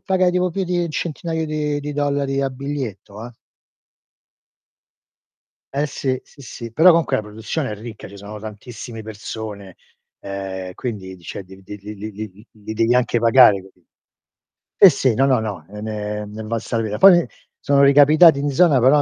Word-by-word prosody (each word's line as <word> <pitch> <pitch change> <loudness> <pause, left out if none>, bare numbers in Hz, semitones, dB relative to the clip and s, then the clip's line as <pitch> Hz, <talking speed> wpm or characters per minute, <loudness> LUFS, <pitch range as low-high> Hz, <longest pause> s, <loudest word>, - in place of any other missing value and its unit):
pagai 185 -2 +1
tipo 180 0 +1
più 190 +3 -2
di 175 -1 -1
1 170 - -5
centinaio 160 +1 -3
di 150 -1 -2
di 145 +1 -5
dollari 140 -1 -1
a 135 - -1
biglietto, 130 -6 -6
eh. - - -10 2.4
Eh. 145 +2 0
sì. 130 -2 -2
Sì, - - -20
sì, 115 -3 -9
però 165 +9 +6
comunque 165 -1 +2
la - - -2
produzione 110 +7 -4
è - - -4
ricca, 110 +1 -10
ci 100 - -13
sono 100 +2 -9
tantissimi 110 +2 -9
persone, 105 -2 -8 0.4
ehm, 95 -1 -6
quindi, 100 -6 -6
di 90 - -21
cioè, 90 - -7
li 95 +1 -15
li 105 +2 -9
li 105 +2 -9
li 105 +2 -7 0.2
li 105 +5 -19
li 105 0 -9
devi 115 +2 +2
anche 125 -1 +2
pagare, 115 -3 +6
capi 95 0 -20 1.0
sì, 195 - +11
sì. 135 -5 +1
No, 135 +5 +2
no, 130 -3 +3
no, 110 -3 -5
e 105 +1 -9
ne 105 -1 -4
è - - -6
ne 105 +1 -9
è - - -7
valsa 115 +1 -4
la 115 - -1
pena. 105 -1 -3
Poi 190 -3 +8
mi 170 - -2 0.3
sono 140 0 +3
ricapitati 145 +3 +6
in 145 +1 -1
zona, 145 -1 +4
però, 140 +4 +5
120 Hz, 190 wpm, -20 LUFS, 105-145 Hz, 2.4 s, sì